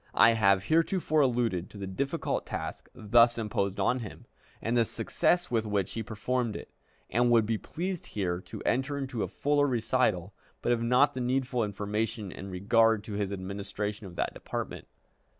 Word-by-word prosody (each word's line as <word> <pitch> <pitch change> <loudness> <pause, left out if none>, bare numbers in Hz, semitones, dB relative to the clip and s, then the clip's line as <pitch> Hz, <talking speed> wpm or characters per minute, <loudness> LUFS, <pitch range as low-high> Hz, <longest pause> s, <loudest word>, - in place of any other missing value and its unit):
I 115 - +7
have 100 -4 +3
heretofore 165 - +2
alluded 115 -9 +1
to - - -12
the 100 - -5
difficult 140 - -2
task - - -5
thus 115 +2 +4
imposed 100 -3 -1
on 120 +6 +2
him, 110 -5 -9 0.3
and 115 +2 -1
the 120 - +5
success 175 +9 0
with 110 -2 +1
which 100 -3 0
he 115 - -3
performed 115 +2 -2
it, - - -8 0.4
and 120 +1 +3
would 115 -2 +5
be 110 0 -1
pleased 180 +1 -4
here 90 -3 -2
to - - -9
enter 135 +3 0
into 130 -5 -3
a - - 0
fuller 145 0 +1
recital, 115 -6 +1 0.3
but - - +2
have 120 -1 +2
not 125 +4 +4
the 130 - -3
needful 125 -1 0
information 105 +1 -2
in 95 - -8
regard 110 +3 +3
to 105 - -7
his 100 -1 -2
administration 100 +2 -4
of 90 - -11
that - - -1
department. - - -5
115 Hz, 175 wpm, -29 LUFS, 100-125 Hz, 0.4 s, I